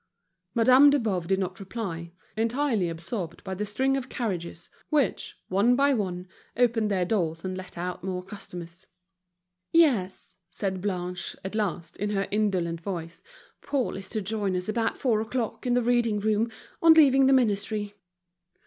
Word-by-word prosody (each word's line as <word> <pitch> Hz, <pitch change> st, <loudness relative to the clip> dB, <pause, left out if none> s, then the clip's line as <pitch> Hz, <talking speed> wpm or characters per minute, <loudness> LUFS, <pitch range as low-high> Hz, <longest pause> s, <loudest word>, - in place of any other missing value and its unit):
Madame 255 Hz, +5 st, +7 dB
de 285 Hz, -, +4 dB
Boves 195 Hz, -9 st, -1 dB
did 190 Hz, +1 st, +2 dB
not 190 Hz, -1 st, -3 dB
reply, 190 Hz, -5 st, -5 dB, 0.2 s
entirely 230 Hz, -4 st, +1 dB
absorbed 170 Hz, +1 st, -5 dB
by 190 Hz, -2 st, -4 dB
the 205 Hz, +3 st, -3 dB
string 265 Hz, +6 st, +1 dB
of 265 Hz, -1 st, -3 dB
carriages, 175 Hz, -7 st, -4 dB, 0.2 s
which, 290 Hz, -, 0 dB
one 205 Hz, +6 st, +3 dB
by 280 Hz, +2 st, +4 dB
one, 185 Hz, -5 st, -2 dB, 0.3 s
opened 230 Hz, -3 st, +2 dB
their 185 Hz, -3 st, +1 dB
doors 170 Hz, -4 st, -1 dB
and 185 Hz, 0 st, -3 dB
let 185 Hz, -1 st, -9 dB
out 180 Hz, 0 st, -4 dB
more 185 Hz, -1 st, -3 dB
customers. 175 Hz, -3 st, -9 dB, 0.8 s
"Yes," 250 Hz, -, +2 dB
said 190 Hz, 0 st, -3 dB
Blanche, 180 Hz, -2 st, -3 dB
at 190 Hz, -, -4 dB
last, 180 Hz, -6 st, -2 dB
in 205 Hz, +1 st, -2 dB
her 195 Hz, -1 st, -1 dB
indolent 185 Hz, -6 st, 0 dB
voice. 170 Hz, -2 st, -5 dB, 0.4 s
"Paul 275 Hz, -4 st, -1 dB
is 190 Hz, -1 st, -6 dB
to 215 Hz, -3 st, -2 dB
join 205 Hz, -2 st, -1 dB
us 180 Hz, 0 st, -3 dB
about 225 Hz, +1 st, 0 dB
four 225 Hz, -5 st, +1 dB
o'clock 225 Hz, 0 st, -3 dB
in 245 Hz, -, +2 dB
the 245 Hz, -, +2 dB
reading 235 Hz, -2 st, +2 dB
room, 215 Hz, +2 st, +1 dB, 0.3 s
on 330 Hz, -1 st, +8 dB
leaving 270 Hz, -4 st, +6 dB
the -, -, +5 dB
ministry." 210 Hz, -4 st, +1 dB
205 Hz, 160 wpm, -27 LUFS, 180-235 Hz, 0.8 s, on